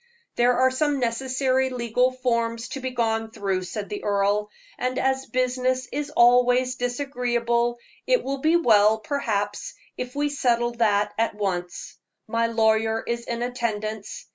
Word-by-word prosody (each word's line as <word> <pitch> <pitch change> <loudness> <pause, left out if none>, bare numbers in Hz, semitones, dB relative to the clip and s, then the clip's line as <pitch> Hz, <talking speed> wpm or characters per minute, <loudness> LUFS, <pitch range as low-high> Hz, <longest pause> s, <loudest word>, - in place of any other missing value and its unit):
"There 245 +1 +3
are 260 +1 +4
some 290 +1 0
necessary 260 +2 0
legal 250 0 +1
forms 235 -2 -1
to 275 - -5
be 260 0 -3
gone 225 -2 -1
through," 195 -3 -2
said 205 +2 -5
the 205 - -5
earl, 205 +1 +1 0.3
"and 255 +1 -1
as 265 0 0
business 255 0 0
is 290 +1 -3
always 250 -1 +4
disagreeable, 245 -2 -1 0.3
it - - +3
will 275 +1 -3
be 315 +4 +3
well, 220 -8 +5
perhaps, 210 -5 -3 0.2
if 250 +1 -5
we 290 0 0
settle 240 -4 +1
that 210 -2 +2
at 230 -2 +1
once. 180 -4 -4 0.3
My 230 +1 +1
lawyer 220 0 +1
is 235 0 -3
in 235 0 -3
attendance. 220 -4 -4
240 Hz, 145 wpm, -24 LUFS, 220-255 Hz, 0.3 s, well